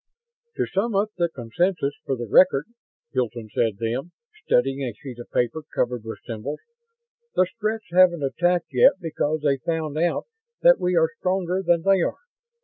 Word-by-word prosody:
"To - - 0
sum 205 +3 -1
up 205 +2 +1
the 170 -1 +1
consensus, 145 +3 -1
for 135 - -1
the 120 -1 -5
record," 145 - +5 0.5
Hilton 120 -4 -2
said 110 -4 +1
then, 120 - -3 0.3
studying 135 - +1
a 125 -5 -3
sheet 125 -4 -9
of 120 - -9
paper 125 +6 0
covered 120 -2 0
with 110 0 -6
symbols, 120 +6 -5 0.7
"the 185 - +4
Stretts 215 +2 -3
haven't 175 -4 +5
attacked 170 +3 0
yet 125 - +6
because 155 -3 -2
they 140 -2 +2
found 155 +1 -2
out 175 +1 0 0.4
that - - +7
we 180 0 0
are 160 -1 +3
stronger 185 0 0
than 170 -2 +2
they 195 -1 +4
are. - - -1
160 Hz, 165 wpm, -24 LUFS, 125-180 Hz, 0.7 s, that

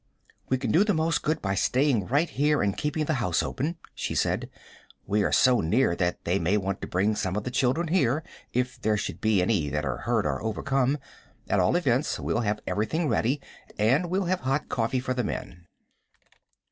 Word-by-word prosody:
"We 130 - +2
can 130 - -2
do 175 - +5
the 210 -3 +1
most 160 +1 +1
good 155 +1 -1
by 95 -1 0
staying 125 0 +1
right 145 +7 +2
here 150 +1 +1
and 100 -1 0
keeping 150 +1 -1
the 155 - 0
house 90 -6 +1
open," 155 +6 -3 0.2
she - - -4
said. - - 0 0.6
"We 105 +1 +1
are - - +1
so 125 -1 +4
near 95 +3 +2
that 90 0 -2
they 90 +3 +1
may 95 +5 +2
want 100 -1 -2
to - - -4
bring 100 +4 +1
some 95 -3 -2
of 105 - -2
the 125 - -4
children 135 +6 +1
here, 155 -4 +2 0.3
if 125 +1 -2
there 110 0 +1
should 100 - -4
be 110 -4 +3
any 90 -7 +1
that 75 +1 -2
are 65 -1 -2
hurt - - 0
or - - -1
overcome. 130 +5 0 0.5
At - - +2
all - - +3
events, - - +1
we'll 80 +9 -1
have 105 -2 -1
everything 150 +10 -1
ready, 125 +5 +1 0.4
and 130 +12 +2
we'll 190 +2 0
have 185 +1 0
hot 135 +3 -1
coffee 120 +2 0
for 130 0 -2
the 125 -1 -1
men." 85 -4 -6
125 Hz, 205 wpm, -27 LUFS, 100-145 Hz, 0.6 s, do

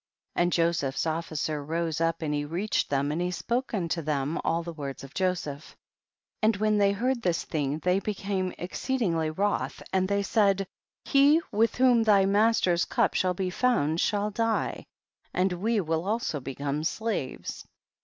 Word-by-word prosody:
And 175 0 +2
Joseph's 165 -6 +1
officer 155 -2 -2
rose 165 +1 -2
up 165 0 0
and 150 -1 -1
he 145 0 0
reached 175 +8 -1
them, 140 +1 0
and 160 +3 -1
he 180 - 0
spoke 240 +7 -2
unto 170 -5 -1
them 145 0 -1
all 165 +1 0
the 170 0 -6
words 140 -4 -6
of 135 +1 -11
Joseph; 175 -6 -2 0.6
and 215 -1 +3
when 215 0 +2
thev 200 0 +3
heard 245 +3 0
this 175 -5 0
thing 145 -2 -1
they 180 +4 +1
became 195 -2 -2
exceedingly 175 - -1
wroth, 200 +6 -1
and 185 0 +2
they 200 0 +1
said, 195 -2 +2 0.4
he 285 +3 +5
with 225 +2 +2
whom 250 -2 +5
thy 205 -3 +5
master's 200 -4 +3
cup - - +1
shall 185 -1 +1
be 185 0 -2
found 175 - +1
shall 210 0 0
die, 225 +2 -1 0.5
and 185 0 +2
we 215 +5 0
will 165 -2 -1
also 215 -8 -1
become 140 +3 -3
slaves. 195 - -3
180 Hz, 165 wpm, -27 LUFS, 160-210 Hz, 0.6 s, he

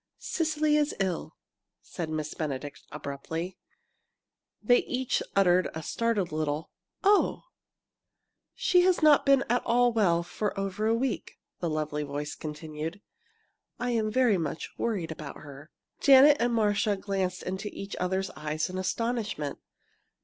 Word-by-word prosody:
"Cecily 310 -2 +1
is 295 0 +1
ill!" 185 -3 -2 0.5
said 165 -3 -5
Miss 155 -1 -3
Benedict, 145 -2 -4
abruptly. 150 +5 -5 1.0
They 245 +3 +4
each 255 0 -1
uttered 185 -2 +4
a 160 - -5
startled 220 -1 0
little 155 0 -2 0.3
"Oh!" 405 +1 +3 1.1
"She 360 - +4
has 360 -2 +3
not 300 -2 +6
been 275 -1 +5
at 245 +2 +2
all 245 0 +3
well 175 -6 +3
for 200 +3 -3
over 195 +2 -1
a 225 - +3
week," 250 0 -2 0.2
the 170 - -1
lovely 155 -1 -2
voice 145 0 -4
continued. 155 +3 -6 0.8
"I 245 0 -1
am 220 -2 +1
very 230 -4 +3
much 160 -1 -4
worried 190 -9 -2
about 155 -2 -7
her." 145 0 -11 0.3
Janet 280 +1 +7
and 240 +1 +2
Marcia 210 -2 +2
glanced 190 -2 -2
into 190 +3 -4
each 195 0 -7
other's 190 +1 -1
eyes 155 +3 -3
in 185 - -4
astonishment. 215 - -2
195 Hz, 135 wpm, -28 LUFS, 155-235 Hz, 1.1 s, Janet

